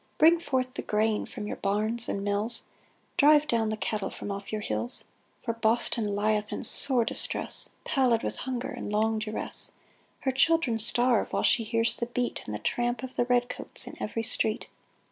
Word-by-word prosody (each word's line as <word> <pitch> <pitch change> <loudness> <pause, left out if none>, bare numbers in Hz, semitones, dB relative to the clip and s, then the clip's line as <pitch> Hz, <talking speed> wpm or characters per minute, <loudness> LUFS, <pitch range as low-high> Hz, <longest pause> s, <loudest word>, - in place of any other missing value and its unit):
Bring 330 +2 +5
forth 260 -5 -3
the - - -5
grain 215 0 -1
from 215 -4 -8
your - - -6
barns 215 +4 +1
and 200 - -3
mills; 205 +3 +3 0.5
Drive 295 +1 +4
down 230 -4 0
the 215 - -4
cattle 210 -2 -3
from 205 - -8
off 200 0 -7
your 215 -1 -4
hills; 235 +3 0 0.4
For 230 - -3
Boston 225 -2 0
lieth 210 +1 -1
in - - -5
sore 245 0 +3
distress, - - +2
Pallid 250 -5 0
with - - -4
hunger 255 0 -5
and - - -7
long 220 +1 0
duress: 215 0 +4 0.5
Her 265 - -1
children 270 -3 +1
starve, 240 +1 +2
while - - -2
she 230 - +3
hears 230 +1 +2
the 235 - -3
beat 245 0 -3
And 105 - -5
the - - -3
tramp 240 - -3
of 260 - -8
the 240 - 0
red 245 0 +1
coats - - -1
in - - -10
every 225 +1 -4
street 220 -1 +3
230 Hz, 185 wpm, -26 LUFS, 215-250 Hz, 0.5 s, Bring